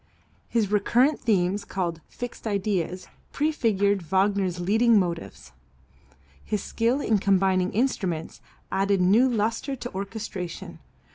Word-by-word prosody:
His 220 -4 0
recurrent 240 +8 +3
themes, 200 -3 +1
called 175 -5 -3
"fixed 245 -2 -7
ideas," 190 -3 -1 0.3
prefigured 215 -10 +1
Wagner's 190 +1 +1
"leading 220 +5 +4
motives." 165 - -3 0.9
His 210 -2 -2
skill 235 +5 0
in 215 -6 +2
combining 190 -1 +2
instruments 190 -9 -2 0.3
added 195 0 +1
new 210 +8 +4
lustre 230 +4 -1
to 245 -1 -7
orchestration. 195 -2 -6
200 Hz, 110 wpm, -25 LUFS, 185-230 Hz, 0.9 s, leading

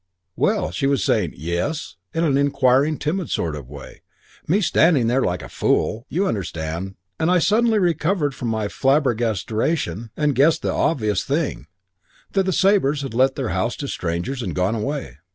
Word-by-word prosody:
"Well, 80 - +1
she 135 +10 -1
was 140 -1 +1
saying - - +1
'Yes?' 85 - -3 0.2
in 165 - -1
an 145 -5 +2
inquiring, 140 +1 +3
timid 170 +4 -2
sort 80 -3 -1
of 70 -4 -9
way, 70 -1 -11 0.5
me 185 +7 +3
standing 160 - +3
there 125 +4 +2
like 90 -5 -1
a - - -7
fool, 115 +4 0
you 185 +5 0
understand, 90 - -3 0.2
and 160 - +1
I 180 - +4
suddenly 220 +5 +3
recovered 170 -4 +1
from 125 - -5
my 110 -2 -1
flabbergasteration 115 - 0
and 150 -2 +2
guessed 145 +5 +3
the - - 0
obvious 110 - 0
thing - - -2 0.6
that 195 -1 +1
the - - +2
Sabres 180 -8 +2
had 135 - -5
let 130 +3 +3
their 130 -5 -2
house 120 - -1
to 140 - -5
strangers 90 +8 -3
and - - -4
gone 90 +4 +1
away. 115 - -4
135 Hz, 170 wpm, -22 LUFS, 100-155 Hz, 0.6 s, I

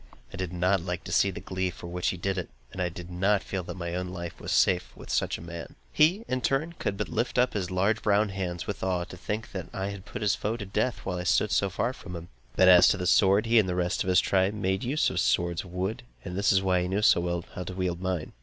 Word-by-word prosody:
I - - -5
did 95 -2 -4
not 90 +1 +1
like 90 0 -4
to - - -7
see 100 - +4
the 95 - -6
glee 95 0 -2
with - - -13
which 90 0 -2
he 90 - 0
did 95 +2 -1
it, 90 - -6 0.2
and 95 - -5
I 90 - +1
did 85 +1 -9
not 95 +3 +2
feel 95 - -3
that - - -7
my 85 -1 -4
own 90 +1 -2
life 85 -2 -6
was - - -6
quite - - +3 0.2
safe 65 - -18
with - - -9
such - - 0
a - - -11
man. 85 0 -8 0.2
He, 180 +9 +3
in 130 - 0
his - - +1
turn, 150 +5 -1
could 100 - -2
but 105 - -2
lift 120 +3 -2
up 125 0 +3
his 95 -4 -2
large 100 +4 +1
brown 105 0 +2
hands 90 -3 -4
with 100 - -5
awe, 90 -2 0
to 90 - -10
think 110 +5 -4
that 95 -4 -5
I 95 +1 -2
had 100 -2 -9
put - - -6
his 100 - +3
foe 110 +3 -2
to 105 - -6
death, 110 +5 -1
while 90 -2 -2
I - - -3
stood 95 +3 +2
so 100 - +2
far 115 +7 -1
from 90 -7 -9
him. 85 0 -8 0.3
But 95 - +5
as 90 -1 +8
to - - +3
the 90 - -3
sword, 100 +3 +4
he 115 0 +5
and 95 -4 +1
the 90 - -1
rest 90 -1 0
of - - -7
his 90 -1 +5
tribe 95 +2 +1
made 95 -2 -1
use 140 +6 +1
of - - -1
swords 85 +7 +1
of 90 - -13
wood, 95 +4 -2 0.2
and 90 -1 -5
this 100 +2 +2
was 95 0 +4
why 90 -1 +2
he 90 - -1
knew 100 +3 -1
so 85 - +5
well 85 0 -2
how 90 - -5
to 90 - -6
wield 90 -2 -2
mine. 90 -4 -3
95 Hz, 295 wpm, -28 LUFS, 90-100 Hz, 0.3 s, as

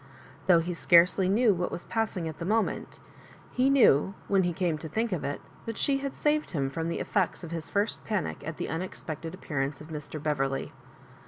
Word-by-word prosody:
Though 175 -3 +6
he 175 +2 -3
scarcely 180 +2 +5
knew 220 +2 +4
what 180 -1 -2
was 175 - -6
passing 215 -7 -1
at 155 -1 -7
the - - -4
moment, 215 +4 -1 0.5
he 260 +1 +3
knew, 195 - +5
when 195 -1 +3
he 175 -1 +1
came 170 -3 -1
to 160 - -6
think 225 +7 -1
of 180 - -2
it, 145 - -2 0.3
that 225 - -4
she 275 -1 +1
had 275 0 -4
saved 300 0 +1
him 135 -6 -1
fh>m 165 +3 -2
the 170 - -2
effects 190 -2 0
of 170 - -7
his 165 -2 -4
first 205 +2 0
panic 205 -7 -2
at 155 +1 -5
the - - -3
un 160 - -2
expected 165 -2 -6
appearance 145 -6 -3
of 155 - -11
Mr. 155 0 -6
Beverley. 135 -2 -1
175 Hz, 210 wpm, -28 LUFS, 155-205 Hz, 0.5 s, Though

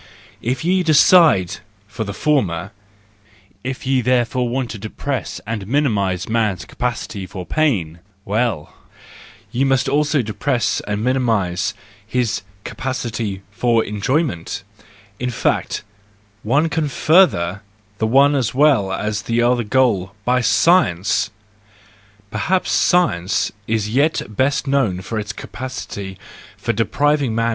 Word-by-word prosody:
If 125 +5 -2
ye 185 +1 +3
decide 155 - +5 0.3
for 105 +2 -4
the 100 - -5
former, 100 - 0 0.9
if 130 +1 -5
ye 130 -1 +2
therefore 125 0 +1
want 125 -1 -2
to 105 - -7
depress 120 +5 -4
and 105 -3 -4
minimise 100 -9 0
man's 110 -4 0
capacity 115 -5 -4
for 90 0 -7
pain, 95 - 0 0.3
well, 105 -6 -1 0.8
ye 125 +3 0
must 135 -1 +2
also 145 0 +2
depress 120 +4 -1
and 105 +1 -2
minimise 110 -5 0 0.3
his 120 +1 -1 0.2
capacity 115 -6 -4
for 115 +1 +2
enjoy¬ 125 +10 0
ment 90 - -5 0.6
In 125 - -1
fact, 120 - -1 0.6
one 140 +9 +2
can 160 -2 -1
further 135 - +3 0.4
the 110 - +1
one 140 +5 +5
as 125 -3 0
well 135 -9 +4
as 105 +1 -2
the 115 +3 0
other 120 0 +2
goal 110 -5 +1
by 125 0 +2
science! 115 - +3 1.0
Perhaps 180 - 0
science 165 - +2 0.2
is 110 -1 0
as - - -4
yet 145 +5 +2
best 135 +5 +1
known 125 -10 0
by 115 - -3
its 105 +1 -4
capacity 110 -7 -7 0.4
for 115 - -1
depriving 140 +3 +1
man 115 0 +1
120 Hz, 125 wpm, -20 LUFS, 105-135 Hz, 1.0 s, decide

